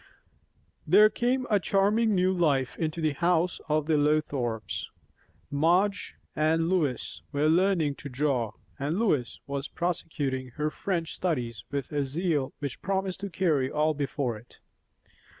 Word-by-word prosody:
There 210 +6 +7
came 255 +2 0
a 205 - +3
charming 205 +3 +2
new 185 +1 +3
life 145 -8 +1
into 160 0 -2
the 155 -2 +1
house 175 +3 +1
of 155 0 +2
the 155 -1 +2
Lothrops. 145 -6 0 0.6
Madge 180 +8 +2 0.2
and 160 +2 +2
Lois 155 -10 -1
were 145 +1 +1
learning 170 -3 +3
to 140 - -8
draw, 125 -5 0 0.3
and 145 +5 -1
Lois 150 - 0
was 140 0 -3
prosecuting 145 -7 -2
her 150 0 -1
French 170 -4 -2
studies 125 -10 -2
with 140 -1 -4
a 145 -1 0
zeal 145 -1 -1
which 140 -4 -5
promised 190 0 -1
to 200 0 -4
carry 155 -8 +1
all 155 +2 +1
before 140 -4 -2
it. 120 - -20
155 Hz, 140 wpm, -28 LUFS, 140-180 Hz, 0.6 s, There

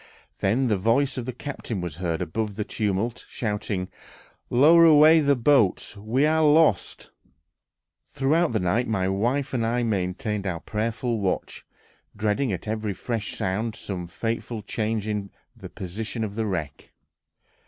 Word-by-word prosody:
Then 115 +7 +1
the 110 -5 +2
voice 130 +7 +2
of 120 - -5
the - - -1
captain 125 -4 -6
was 85 -4 -5
heard 85 -2 -2
above 105 +3 -3
the 105 - -2
tumult, 105 +2 -2
shouting, 105 -4 -3 0.6
"Lower 155 +7 +6
away 160 0 +7
the 140 -2 +3
boats! 120 -6 +2
We 110 +8 0
are 160 +1 +3
lost!"... 150 - +3 1.0
Throughout 155 +4 +1
the 110 - 0
night 100 +7 0
my 95 -4 0
wife 120 +9 0
and 120 -3 0
I 120 +2 0
maintained 105 0 -2
our 85 -3 -2
prayerful 115 +2 -2
watch, 95 -2 -3 0.5
dreading 110 +4 0
at 95 +3 -5
every 110 -1 -2
fresh 110 +2 -4
sound 105 +4 -2
some 90 -6 -6
fatal 115 +3 -4
change 110 0 -2
in 105 -2 -3 0.3
the - - -10
position 110 +5 -5
of 105 -2 -4
the 110 0 -2
wreck. 80 -7 -4
110 Hz, 150 wpm, -25 LUFS, 100-125 Hz, 1.0 s, away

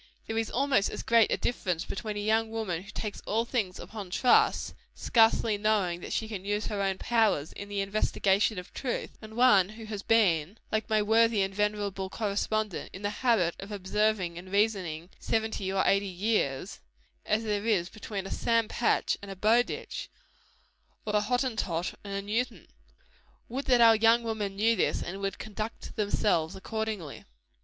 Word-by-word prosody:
There 225 - -3
is 225 - -2
almost 265 -5 +2
as - - -6
great 230 -1 +4
a - - +2
difference 180 -8 -2
between 210 0 -4
a - - -2
young 220 +1 +1
woman 215 -7 -3
who 200 - -14
takes 210 -1 -5
all 225 +2 +1
things 215 -7 -2
upon 205 -4 -8
trust, 245 +7 +3 0.2
scarcely 225 -2 +3
knowing 200 -5 +1
that - - -7
she 220 - -1
can 205 -4 -6
use 205 +1 -1
her 205 -2 -2
own 195 -1 0
powers 215 -11 +1
in 200 - -8
the 200 -1 -1
investigation 200 0 +1
of 180 - -8
truth, 255 -3 -3
and 220 0 -10
one 205 -7 +5
who 220 +1 -10
has 210 -2 -5
been, 195 -5 +2
like 215 +1 -1
my 215 -1 +3
worthy 225 -1 +4
and 195 0 -3
venerable 205 -2 -1
correspondent, 210 -1 -2
in 190 - -9
the 205 - 0
habit 210 -9 +2
of 195 +2 -8
observing 200 -3 0
and 185 +1 -12
reasoning 190 -5 0
seventy 220 -4 -1
or 190 0 +2
eighty 195 0 +3
years, 185 -8 -1 0.4
as 220 +1 0
there 210 0 -1
is 190 -6 +2
between 205 -2 -6
a 195 - -6
Sam 230 -1 +1
Patch 240 - +1
and 200 - -9
a 195 - -6
Bowditch 220 +6 0 1.0
or 210 -1 -1
a 210 - +4
Hottentot 220 -7 -1
and 200 -1 -6
a 200 - -3
Newton. 220 -2 -2 0.8
Would 265 +4 -4
that 250 -3 +4
our 225 -1 +8
young 230 +2 +4
women 215 -3 -3
knew 225 +3 +3
this, 185 - 0
and 190 +3 -6
would 195 0 -2
conduct 215 +1 -6
themselves 200 -6 +1
accordingly! 215 -6 -4
210 Hz, 175 wpm, -29 LUFS, 195-225 Hz, 1.0 s, our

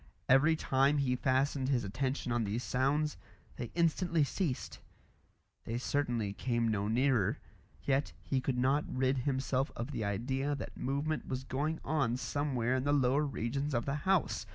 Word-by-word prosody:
Every 145 +5 +5
time 135 -1 +2
he 130 -3 +1
fastened 130 +1 +1
his 125 -4 +2
attention 130 +5 -2
on 120 -1 +1
these 110 +4 -2
sounds, 145 +4 +1 0.4
they 120 - -4
instantly 170 -1 +2
ceased. 145 -2 -2 0.9
They 115 - -2
certainly 120 -6 -1
came 120 +1 0
no 105 -2 0
nearer. 120 -2 +2 0.5
Yet 140 +1 +1
he 135 -1 -1
could 130 -1 -1
not 135 +4 +2
rid 130 +1 +1
himself 130 0 0
of 120 +5 -4
the 115 - -3
idea 130 +8 -1
that 140 - -7
movement 145 +3 -2
was 130 0 -3
going 150 +5 -2
on 135 -6 +1
somewhere 130 -3 -1
in 130 - -1
the 145 +1 +2
lower 140 +1 +3
regions 135 +3 -2
of 120 - 0
the 140 - -1 0.2
house. 180 - +1
130 Hz, 160 wpm, -33 LUFS, 120-145 Hz, 0.9 s, Every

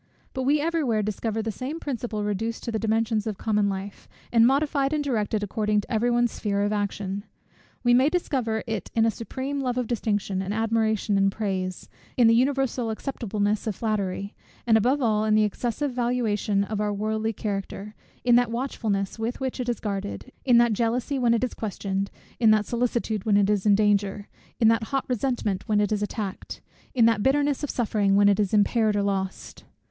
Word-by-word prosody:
But 260 -1 -2
we 295 +3 +3
every 330 +1 0
where 220 -5 +1
discover 220 +1 -2
the 225 - -2
same 265 +9 -5
principle 240 -7 -3
reduced 215 +3 -2
to 235 - -3
the 220 - -1
dimensions 220 0 0
of 210 -3 -3
common 210 -2 +1
life, 195 +1 -6 0.2
and 230 -1 +6
modified 280 +1 +1
and 300 -1 0
directed 215 -5 -1
according 210 +1 0
to - - -14
every 230 +2 +2
one's 240 -1 +2
sphere 200 -1 -1
of 205 +1 0
action. 200 -1 -2 0.6
We 240 -1 +4
may 260 +4 +5
discover 255 -10 -1
it 220 -4 -4
in 225 -1 +4
a 225 - +3
supreme 265 +6 -4
love 250 -2 -1
of 250 - 0
distinction, 205 -4 -1
and 195 +2 -3
admiration, 220 -2 +1
and 195 0 +3
praise; 190 -3 -3 0.3
in 245 - +5
the 225 - +6
universal 260 -1 +1
acceptableness 215 -3 -2
of 210 - -1
flattery; 200 -2 -2 0.3
and 230 -2 +4
above 255 +6 +2
all 215 -2 +2
in 215 0 +3
the 215 - +4
excessive 240 +6 -1
valuation 235 -5 0
of 210 +1 -3
our 210 0 0
worldly 215 +2 -1
character, 200 0 -5 0.3
in 245 - +4
that 245 -1 +2
watchfulness 225 -5 -2
with 230 +2 -3
which 265 -1 -3
it 250 -1 -2
is 240 - -1
guarded, 195 - -4
in 245 -3 +5
that 235 -1 +4
jealousy 240 +5 0
when 235 -2 +3
it 230 - -1
is 250 - -1
questioned, 195 -2 -3 0.3
in 225 -3 +5
that 215 -1 +4
solicitude 235 -3 -1
when 205 -2 +3
it 205 0 +3
is 205 0 0
in 205 - +6
danger, 205 -1 +1 0.3
in 225 - +5
that 225 0 +3
hot 270 +2 -2
resentment 245 -5 -1
when 210 -1 +3
it 210 0 +1
is 210 -1 0
attacked, 205 -2 -4 0.4
in 235 -3 +5
that 225 -2 +3
bitterness 285 +3 +1
of 290 - -2
suffering 210 -4 +1
when 200 0 +5
it 200 - +2
is 205 -3 +1
impaired 215 +1 +3
or 205 - +1
lost. 190 -1 -3
220 Hz, 200 wpm, -25 LUFS, 205-245 Hz, 0.6 s, and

